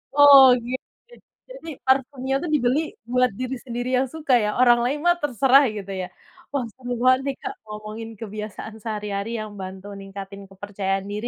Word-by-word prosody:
Oh, 280 Hz, -3 st, +9 dB
oke 240 Hz, 0 st, -6 dB
oke. 485 Hz, 0 st, -23 dB, 0.3 s
Jadi, -, -, -10 dB, 0.2 s
parfumnya 265 Hz, 0 st, +1 dB
tuh 345 Hz, -, -3 dB
dibeli 260 Hz, 0 st, +2 dB, 0.3 s
buat 250 Hz, -1 st, +3 dB
diri 255 Hz, +1 st, -3 dB
sendiri 245 Hz, +1 st, -4 dB
yang 265 Hz, +1 st, +1 dB
suka, 300 Hz, -4 st, 0 dB
ya? 210 Hz, -, 0 dB
Orang 240 Hz, -1 st, +6 dB
lain 270 Hz, +5 st, -1 dB
mah 350 Hz, 0 st, +5 dB
terserah, 270 Hz, 0 st, +4 dB
gitu 200 Hz, -1 st, -6 dB
ya? 180 Hz, -, -4 dB, 0.4 s
Wah 280 Hz, -3 st, -1 dB
seru 250 Hz, -1 st, -8 dB
banget 255 Hz, 0 st, +5 dB
nih 275 Hz, -, -1 dB
Kak, -, -, -4 dB
ngomongin 215 Hz, +1 st, -7 dB
kebiasaan 215 Hz, 0 st, -7 dB
sehari-hari 210 Hz, -1 st, -4 dB
yang 215 Hz, -1 st, -6 dB
bantu 190 Hz, +1 st, -8 dB
ningkatin 195 Hz, 0 st, -9 dB
kepercayaan 195 Hz, 0 st, -3 dB
diri, 210 Hz, +3 st, -3 dB
240 Hz, 170 wpm, -23 LUFS, 205-265 Hz, 0.4 s, Oh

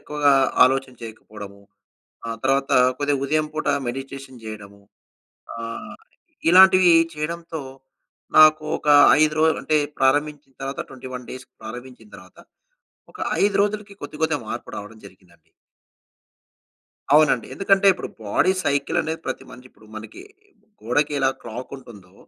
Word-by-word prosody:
ఎక్కువగా 150 Hz, -1 st, +1 dB, 0.3 s
ఆలోచన 135 Hz, +1 st, 0 dB
చెయ్యకపోడము. 105 Hz, -3 st, -11 dB, 0.7 s
ఆ -, -, -3 dB
తర్వాత 135 Hz, +1 st, 0 dB, 0.3 s
కొద్దిగా 145 Hz, -1 st, 0 dB
ఉదయం 155 Hz, +2 st, 0 dB
పూట 155 Hz, -, -4 dB, 0.2 s
మెడిటేషన్ 135 Hz, -1 st, -8 dB
చెయడము. 100 Hz, -2 st, -10 dB, 0.8 s
ఆహ్, 115 Hz, 0 st, -7 dB, 0.5 s
ఇలాంటివీ 185 Hz, -1 st, +7 dB, 0.2 s
చెయడంతో, 165 Hz, +1 st, -5 dB, 0.8 s
నాకు 155 Hz, 0 st, +6 dB
ఒక -, -, -6 dB, 0.3 s
5 155 Hz, 0 st, +3 dB
రోలు, 160 Hz, 0 st, +3 dB
అంటే, 155 Hz, -, +1 dB, 0.2 s
ప్రారంభించిన 145 Hz, +1 st, 0 dB
తర్వాత 135 Hz, +1 st, -5 dB
21 130 Hz, -1 st, -9 dB
డేస్‌కి, 130 Hz, +1 st, -11 dB
ప్రారంభించిన 125 Hz, 0 st, -10 dB
తర్వాత 95 Hz, 0 st, -17 dB, 0.7 s
ఒక -, -, -13 dB, 0.2 s
5 200 Hz, 0 st, +2 dB
రోజులకి 205 Hz, 0 st, -3 dB
కొద్ది 150 Hz, -, -8 dB
కొద్దిగా 160 Hz, -2 st, +1 dB
మార్పు 120 Hz, -, -6 dB
రావడం 105 Hz, +2 st, -9 dB
జరిగిందండి. 85 Hz, -4 st, -22 dB, 1.6 s
అవునండి. 150 Hz, -6 st, +4 dB
ఎందుకంటే, 195 Hz, 0 st, +2 dB
ఇప్పుడు 185 Hz, -, -7 dB, 0.2 s
బాడీ 105 Hz, -, +2 dB
సైకిలనేది, 145 Hz, +3 st, -1 dB
ప్రతి -, -, -5 dB
మనిషి 125 Hz, +1 st, -13 dB
ఇప్పుడు 110 Hz, -, -22 dB
మనకి 110 Hz, 0 st, -10 dB, 0.6 s
గోడకి 145 Hz, +7 st, 0 dB
ఎలా 135 Hz, 0 st, +2 dB
క్లాకుంటుందో, 115 Hz, -5 st, -10 dB
135 Hz, 120 wpm, -22 LUFS, 115-155 Hz, 1.6 s, ఇలాంటివీ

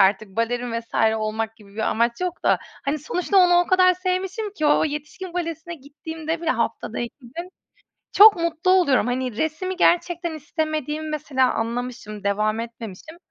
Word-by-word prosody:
artık 200 Hz, +2 st, +3 dB
balerin 240 Hz, +1 st, -1 dB
vs. 230 Hz, -, -20 dB, 0.2 s
olmak 220 Hz, +1 st, -3 dB
gibi 200 Hz, -2 st, -18 dB
bir -, -, -12 dB
amaç 235 Hz, +5 st, +1 dB
yok 360 Hz, -1 st, -3 dB
da -, -, +4 dB, 0.3 s
hani 290 Hz, +2 st, 0 dB
sonuçta 360 Hz, +6 st, -1 dB
onu 355 Hz, -1 st, +6 dB
o 355 Hz, -, 0 dB
kadar 370 Hz, 0 st, +5 dB
sevmişim 375 Hz, +3 st, -2 dB
ki 310 Hz, -7 st, -1 dB
o 295 Hz, +1 st, +4 dB
yetişkin 305 Hz, +5 st, -5 dB
balesine 335 Hz, -1 st, -4 dB
gittiğimde 320 Hz, +3 st, -6 dB
bile 330 Hz, -, 0 dB
haftada -, -, -2 dB
2 240 Hz, -1 st, -4 dB
gün 330 Hz, +9 st, -8 dB, 0.6 s
çok 415 Hz, -1 st, +9 dB
mutlu 335 Hz, +2 st, 0 dB
oluyorum. 315 Hz, -10 st, +4 dB
Hani 250 Hz, -2 st, -2 dB
resimi 360 Hz, +6 st, -2 dB
gerçekten 345 Hz, -2 st, +2 dB
istemediğimi 310 Hz, 0 st, -3 dB
mesela 275 Hz, -4 st, +1 dB
anlamışım, 230 Hz, -3 st, -4 dB
devam 215 Hz, +2 st, +1 dB
etmemişim. 230 Hz, -, -8 dB
305 Hz, 160 wpm, -23 LUFS, 235-345 Hz, 0.6 s, çok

